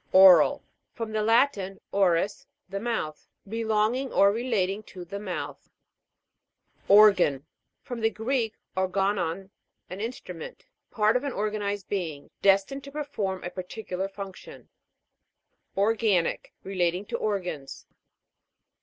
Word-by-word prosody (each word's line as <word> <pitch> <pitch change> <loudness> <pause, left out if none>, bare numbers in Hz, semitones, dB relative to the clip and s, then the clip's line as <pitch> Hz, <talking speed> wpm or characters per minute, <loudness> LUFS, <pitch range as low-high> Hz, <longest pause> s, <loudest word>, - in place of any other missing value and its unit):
O'RAL. 185 -4 +8 0.3
From 225 -1 -5
the 215 0 0
Latin, 215 -4 +2
oris, 195 0 +1 0.2
the 195 +1 -4
mouth. 205 -10 -3 0.2
Relonging 225 +4 0
or 200 -3 +5
relating 210 -4 -1
to 185 -4 -10
the 200 +4 -6
mouth. 190 -4 -6 1.2
OR'GAN. 195 -9 +6 0.4
From 245 -2 -6
the 225 - +3
Greek, 225 0 -1 0.2
organon, 190 -1 0 0.4
an 190 +2 -5
instrument. 255 - -7 0.2
Part 215 +1 +2
of 250 - +1
an 280 -3 -3
organ 210 +1 -2
ized 200 -1 -3
being, 160 -8 -4
destined 200 +8 +3
to 280 - -9
perform 275 -11 -3
a 175 - -4
particular 185 0 -5
function. 195 -1 -10 1.1
ORGA'NIC. 205 -4 +1
Relating 185 0 -1
to - - -3
organs. 180 -9 -3
200 Hz, 115 wpm, -27 LUFS, 185-225 Hz, 1.2 s, O'RAL